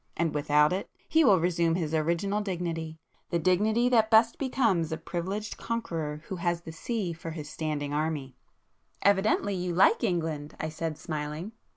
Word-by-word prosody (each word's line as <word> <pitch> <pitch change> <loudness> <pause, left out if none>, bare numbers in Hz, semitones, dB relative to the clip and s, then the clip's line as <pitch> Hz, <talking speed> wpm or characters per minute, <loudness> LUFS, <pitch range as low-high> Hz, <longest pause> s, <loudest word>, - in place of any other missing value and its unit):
And 165 -2 0
without 150 +1 +3
it, 190 - -3 0.2
he 320 0 +4
will 200 - +6
resume 170 -1 +1
his 160 -3 -2
original 170 +6 +1
dignity;—the 170 -3 -4
dignity 210 +8 +2
that 225 -3 +4
best 225 +1 +5
becomes 225 - +1
a 160 - -1
privileged 190 +7 -4
conqueror 165 -10 -3
who 190 - -4
has 170 0 -1
the 165 - -8
sea 190 +2 -3
for 165 0 -7
his 155 -2 -6
standing 150 -2 -3
army." 150 -4 -2 0.7
"Evidently 200 +1 +3
you 180 -2 -2
like 195 +6 +5
England!" 160 -7 -1
I 155 - -2
said 155 0 -4
smiling. 155 +4 -4
170 Hz, 160 wpm, -28 LUFS, 155-200 Hz, 0.7 s, will